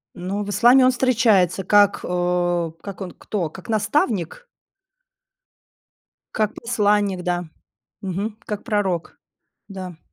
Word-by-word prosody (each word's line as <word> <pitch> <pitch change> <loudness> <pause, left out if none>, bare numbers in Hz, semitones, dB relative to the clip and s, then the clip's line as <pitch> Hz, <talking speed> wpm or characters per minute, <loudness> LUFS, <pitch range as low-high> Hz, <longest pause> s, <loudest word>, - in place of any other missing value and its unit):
Ну, 195 +3 -3
в 205 - -7
исламе 245 +5 +5
он 255 - +5
встречается 225 -8 +2
как, 205 +1 +4
э, 175 -1 0
как 200 -1 -8
он, 185 -2 -5
кто, 180 -7 -4
как 185 +4 -13
наставник? 220 - -1 1.9
Как 215 0 0
посланник, 205 -5 0
да, 175 -1 -1 0.6
мгм, 200 +3 -4
как 210 -1 -5
пророк. 195 -7 -2 0.5
Да. 185 -4 -8
200 Hz, 115 wpm, -22 LUFS, 180-215 Hz, 1.9 s, исламе